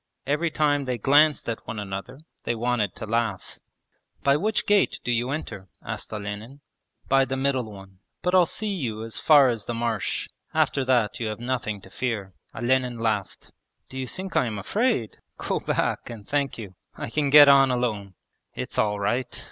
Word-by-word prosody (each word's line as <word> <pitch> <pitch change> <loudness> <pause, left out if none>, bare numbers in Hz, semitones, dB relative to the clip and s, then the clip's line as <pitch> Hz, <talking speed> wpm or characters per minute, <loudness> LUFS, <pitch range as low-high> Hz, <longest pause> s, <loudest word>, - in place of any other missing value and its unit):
Every 150 +5 +1
time 145 -2 +1
they 125 -1 -2
glanced 145 +5 +4
at 115 -1 -4
one 110 - -5
another 100 +7 -6 0.2
they 120 - -1
wanted 115 -4 0
to - - -6
laugh. 110 -4 -2 0.6
'By 140 0 +4
which 210 +8 0
gate 205 -1 +2
do 125 - -1
you 120 +1 0
enter?' 135 -10 -5 0.2
asked - - -5
Olenin. 105 +6 -6 0.5
'By 135 0 +4
the 135 0 -2
middle 130 -4 0
one. 95 -2 -13 0.2
But 180 - 0
I'll 180 -2 +6
see 210 +3 -2
you 115 - -3
as 115 0 -5
far 145 -4 +6
as 115 -3 -3
the 120 - -2
marsh. 115 -3 -2 0.3
After 135 - +2
that 120 -5 +2
you 115 - -2
have 110 0 -4
nothing 120 -4 -3
to 95 - -15
fear.' 105 -7 -3 0.2
Olenin 125 0 +1
laughed. 110 -4 -2 0.4
'Do 130 - -7
you 130 - -3
think 190 +7 -7
I 125 - +3
am 110 -2 -4
afraid? 200 - 0 0.2
Go - - -2
back, - - -1
and 110 -4 -9
thank 140 -1 -1
you. 105 -5 -8 0.2
I - - -6
can 145 0 +1
get 145 0 +9
on 135 -1 +7
alone.' 110 -6 -2 0.4
'It's - - -4
all 105 -1 +1
right! 120 +5 -1
120 Hz, 185 wpm, -25 LUFS, 110-140 Hz, 0.6 s, get